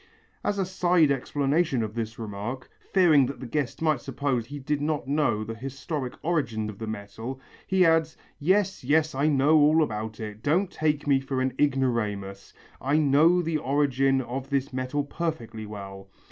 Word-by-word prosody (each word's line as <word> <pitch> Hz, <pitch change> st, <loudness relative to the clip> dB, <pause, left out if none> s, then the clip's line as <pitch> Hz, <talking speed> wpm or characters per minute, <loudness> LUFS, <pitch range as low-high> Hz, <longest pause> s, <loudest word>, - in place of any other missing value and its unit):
As 205 Hz, -, 0 dB
a 195 Hz, -, +1 dB
side 175 Hz, -4 st, +3 dB
explanation 140 Hz, 0 st, +1 dB
of 105 Hz, -1 st, -4 dB
this 115 Hz, -1 st, -4 dB
remark, 110 Hz, +4 st, -6 dB, 0.2 s
fearing 160 Hz, -8 st, +5 dB
that 140 Hz, -, -6 dB
the -, -, -7 dB
guest 145 Hz, +3 st, -2 dB
might 155 Hz, -6 st, +2 dB
suppose 135 Hz, -3 st, -2 dB
he 145 Hz, +2 st, -7 dB
did 145 Hz, +1 st, -2 dB
not 150 Hz, -4 st, -1 dB
know 140 Hz, -7 st, +1 dB
the 110 Hz, +1 st, -5 dB
historical 135 Hz, +2 st, -5 dB
origin 115 Hz, -11 st, -1 dB
of 100 Hz, -, -15 dB
the 110 Hz, -, -5 dB
metal, 110 Hz, +5 st, -6 dB, 0.3 s
he 190 Hz, -1 st, +4 dB
adds: 160 Hz, -1 st, +2 dB, 0.2 s
"Yes, 190 Hz, +4 st, +1 dB
yes, 155 Hz, +4 st, +2 dB
I 140 Hz, +3 st, +1 dB
know 150 Hz, +1 st, +4 dB
all 155 Hz, +2 st, +5 dB
about 110 Hz, -4 st, -4 dB
it. 105 Hz, -1 st, -7 dB
Don't 175 Hz, -, +1 dB
take 150 Hz, -2 st, 0 dB
me 140 Hz, -2 st, +4 dB
for 135 Hz, 0 st, -3 dB
an 130 Hz, -1 st, 0 dB
ignoramus. 110 Hz, -8 st, -1 dB, 0.3 s
I 140 Hz, +4 st, +2 dB
know 155 Hz, +4 st, +4 dB
the 160 Hz, -1 st, -1 dB
origin 135 Hz, -1 st, +2 dB
of 130 Hz, +2 st, -5 dB
this 140 Hz, -1 st, -1 dB
metal 130 Hz, +3 st, -1 dB
perfectly 140 Hz, -9 st, -4 dB
well. 100 Hz, -2 st, -9 dB
135 Hz, 175 wpm, -26 LUFS, 115-155 Hz, 0.3 s, fearing